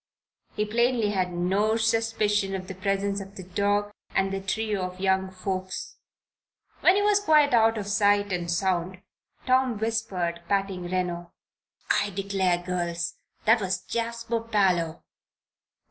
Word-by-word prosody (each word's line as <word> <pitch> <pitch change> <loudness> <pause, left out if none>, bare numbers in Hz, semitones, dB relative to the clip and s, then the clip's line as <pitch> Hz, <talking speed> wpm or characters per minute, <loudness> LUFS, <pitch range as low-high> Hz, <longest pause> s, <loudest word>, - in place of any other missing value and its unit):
He 210 - 0
plainly 230 0 +1
had 185 -3 0
no 195 +5 +1
suspicion 220 -3 +1
of 185 -1 -6
the 190 - -5
presence 195 +1 -1
of 195 +1 -11
the 190 - -8
dog 205 +3 0 0.2
and 195 0 +1
the 195 - -2
trio 210 +1 -1
of 185 0 -5
young 190 0 +1
folks. 185 0 -5 0.8
When 370 - +5
he 410 - +2
was 415 -1 +4
quite 305 -8 +4
out 225 -1 +4
of 205 - -3
sight 205 -1 +2
and 175 -1 -2
sound, 185 +1 -1 0.4
Tom 255 -2 +2
whispered, 205 -6 -2
patting 195 -2 0
Reno: 175 -1 -3 0.6
"I 205 - +2
declare, 190 -2 0
girls! 175 -1 -2 0.3
That 225 +1 +5
was 185 -1 -2
Jasper 230 0 -2
Parloe!" 190 -7 +1
195 Hz, 140 wpm, -26 LUFS, 185-220 Hz, 0.8 s, When